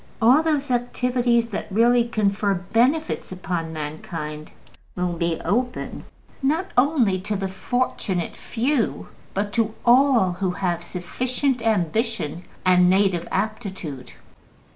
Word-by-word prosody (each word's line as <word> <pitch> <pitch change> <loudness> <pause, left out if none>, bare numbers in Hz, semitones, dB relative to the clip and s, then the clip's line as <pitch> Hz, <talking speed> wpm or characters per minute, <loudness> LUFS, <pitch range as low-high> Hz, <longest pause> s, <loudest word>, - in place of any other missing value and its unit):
All 250 +7 +6
those 295 -4 0
activities 245 -1 +1
that 210 - -4
really 235 +4 +4
confer 205 -3 +1
benefits 240 - 0
upon 175 -3 -3
mankind 155 0 -6 0.4
will 180 -1 -1
be 170 -1 -1
open, 245 +8 -2 0.4
not 315 +8 0
only 245 -8 +3
to 210 +2 -2
the 195 0 -2
fortunate 190 -3 -2
few, 245 +1 -1 0.3
but 205 +1 -1
to 225 -1 0
all 245 -5 +5
who 185 +1 -2
have 175 -2 -1
sufficient 250 +9 -2
ambition 220 - -1 0.2
and 180 -1 +5
native 190 -3 +2
aptitude. 190 - -4
210 Hz, 115 wpm, -23 LUFS, 180-245 Hz, 0.4 s, All